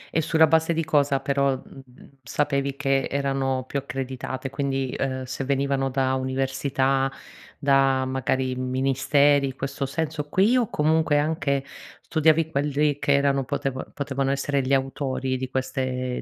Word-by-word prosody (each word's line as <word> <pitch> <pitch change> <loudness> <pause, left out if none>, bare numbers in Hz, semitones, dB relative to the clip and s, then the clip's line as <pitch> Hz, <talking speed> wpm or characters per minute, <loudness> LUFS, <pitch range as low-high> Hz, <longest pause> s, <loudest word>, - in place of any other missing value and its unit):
E 160 - +3
sulla 160 0 +4
base 160 +1 +2
di 165 0 -1
cosa 145 -3 +2
però, 140 0 +1
mhmm, 135 +1 -15
sapevi 140 +2 -1
che 135 -1 +1
erano 135 -2 -1
più 140 - -2
accreditate? 130 0 -5
Quindi, 135 -1 -1
ehm, 130 -1 -2
se 130 +1 -5
venivano 135 0 0
da 130 0 0
università, 135 +1 0 0.5
da 135 -2 +3
magari 130 0 -1
ministeri, 135 +2 +2
in 130 - -6
questo 135 0 -3
senso 150 0 -3
qui, 200 +10 +3
o 245 -4 +2
comunque 155 0 +2
anche 145 -2 0 0.4
studiavi 160 0 +2
quelli 145 0 0
che 140 - +2
erano 140 -1 +2
poteva 135 -1 -3
potevano 135 -1 -2
essere 140 +1 0
gli 130 +1 -1
autori 135 -1 -2
di 130 0 -4
queste 130 -1 -2
135 Hz, 145 wpm, -24 LUFS, 130-145 Hz, 0.5 s, sulla